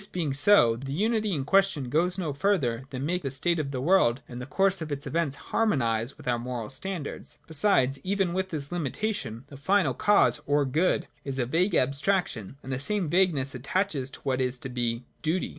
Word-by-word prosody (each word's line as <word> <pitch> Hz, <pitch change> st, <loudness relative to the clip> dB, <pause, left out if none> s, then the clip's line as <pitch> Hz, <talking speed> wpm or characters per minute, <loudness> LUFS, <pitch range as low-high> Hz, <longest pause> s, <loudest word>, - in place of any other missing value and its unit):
115 180 Hz, -, -5 dB
being 150 Hz, -5 st, 0 dB
so, 145 Hz, -, +5 dB
the 135 Hz, +3 st, -7 dB
unity 215 Hz, +6 st, 0 dB
in 140 Hz, -7 st, -2 dB
question 195 Hz, -6 st, +2 dB
goes 170 Hz, +7 st, +1 dB
no 165 Hz, -6 st, -2 dB
further 140 Hz, -, 0 dB
than 130 Hz, 0 st, -4 dB
make 180 Hz, +3 st, -1 dB
the 135 Hz, -, -3 dB
state 165 Hz, +6 st, +1 dB
of 145 Hz, -3 st, -2 dB
the 135 Hz, -2 st, -4 dB
world 135 Hz, -5 st, +3 dB
and 125 Hz, 0 st, -8 dB
the 125 Hz, -, -7 dB
course 195 Hz, +4 st, +2 dB
of 155 Hz, -1 st, -5 dB
its 140 Hz, 0 st, -4 dB
events 160 Hz, -4 st, -1 dB
harmonise 125 Hz, -, 0 dB
with -, -, -13 dB
our 120 Hz, -1 st, +1 dB
moral 120 Hz, -3 st, -5 dB
standards 170 Hz, +2 st, -3 dB
\ -, -, -34 dB
Besides, 140 Hz, -6 st, +2 dB
even 195 Hz, -2 st, 0 dB
with 190 Hz, +1 st, -1 dB
this 145 Hz, -3 st, -3 dB
limitation, 155 Hz, -, -3 dB
the 140 Hz, -, -10 dB
final 175 Hz, -1 st, +2 dB
cause, 125 Hz, -6 st, +3 dB
or 145 Hz, 0 st, +2 dB
Good, 155 Hz, +8 st, +1 dB, 0.2 s
is 135 Hz, -1 st, -3 dB
a 125 Hz, -, +1 dB
vague 170 Hz, -, +1 dB
abstraction, 140 Hz, -, 0 dB
and 130 Hz, -, -5 dB
the 130 Hz, -, -2 dB
same 180 Hz, +2 st, +1 dB
vagueness 165 Hz, -8 st, +2 dB
attaches 140 Hz, +1 st, -1 dB
to -, -, -12 dB
what 130 Hz, -1 st, -1 dB
is 125 Hz, 0 st, +1 dB
to 135 Hz, -, -5 dB
be 120 Hz, -1 st, -2 dB, 0.2 s
Duty. 165 Hz, +4 st, -1 dB
145 Hz, 210 wpm, -27 LUFS, 130-185 Hz, 0.2 s, so